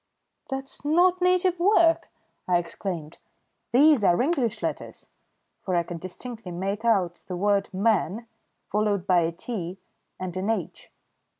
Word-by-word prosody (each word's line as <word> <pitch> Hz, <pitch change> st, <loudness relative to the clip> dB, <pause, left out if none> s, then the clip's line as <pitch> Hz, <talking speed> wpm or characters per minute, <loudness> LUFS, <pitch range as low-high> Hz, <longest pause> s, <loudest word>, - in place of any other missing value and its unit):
"That's 270 Hz, 0 st, -5 dB
not 355 Hz, +5 st, +3 dB
native 365 Hz, 0 st, +2 dB
work," 345 Hz, -3 st, +4 dB, 0.4 s
I 180 Hz, -1 st, +4 dB
exclaimed. 170 Hz, -2 st, -5 dB, 0.5 s
"These 280 Hz, -1 st, +5 dB
are 175 Hz, -3 st, +4 dB
English 260 Hz, -4 st, 0 dB
letters," -, -, -5 dB, 0.5 s
for 185 Hz, -, -2 dB
I 170 Hz, -, +2 dB
could 170 Hz, 0 st, -7 dB
distinctly 210 Hz, +3 st, -7 dB
make 195 Hz, +5 st, -3 dB
out 190 Hz, -7 st, +1 dB
the 180 Hz, -, -4 dB
word 200 Hz, +1 st, +1 dB
"man" 205 Hz, +1 st, +1 dB, 0.5 s
followed 205 Hz, -3 st, +1 dB
by 180 Hz, -2 st, +4 dB
a 165 Hz, 0 st, +1 dB
"t" 180 Hz, 0 st, -5 dB, 0.4 s
and 185 Hz, -1 st, -5 dB
an 190 Hz, +3 st, -2 dB
"h." 210 Hz, -7 st, -3 dB
205 Hz, 135 wpm, -26 LUFS, 180-270 Hz, 0.5 s, These